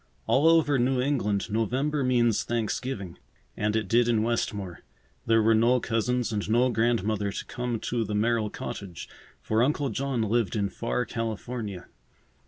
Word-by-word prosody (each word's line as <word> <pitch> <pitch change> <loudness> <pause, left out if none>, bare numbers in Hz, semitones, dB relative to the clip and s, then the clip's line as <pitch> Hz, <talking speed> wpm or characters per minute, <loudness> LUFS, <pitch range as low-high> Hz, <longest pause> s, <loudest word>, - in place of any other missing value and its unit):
All 145 +4 +3
over 160 -4 +4
New 125 +1 +2
England 115 -7 0
November 130 +7 0
means 120 -3 +2
Thanksgiving, 115 -4 -3 0.4
and 105 +1 -1
it 110 -3 0
did 120 +4 +3
in 115 -2 +2
Westmore. 105 -6 -2 0.5
There 115 -1 +4
were 115 +1 +4
no 120 +3 +4
cousins 125 +1 -1
and 105 -1 -2
no 125 +3 +3
grandmother 110 -3 0
to - - -5
come 120 -2 -3
to 120 -1 -1
the 105 -1 -3
Merrill 110 0 +1
cottage, 95 -4 -7 0.4
for 110 +1 +1
Uncle 140 +2 +1
John 130 0 -1
lived 110 -2 0
in 100 -2 0
far 120 +5 -2
California. 110 -3 -4
115 Hz, 155 wpm, -27 LUFS, 105-125 Hz, 0.5 s, over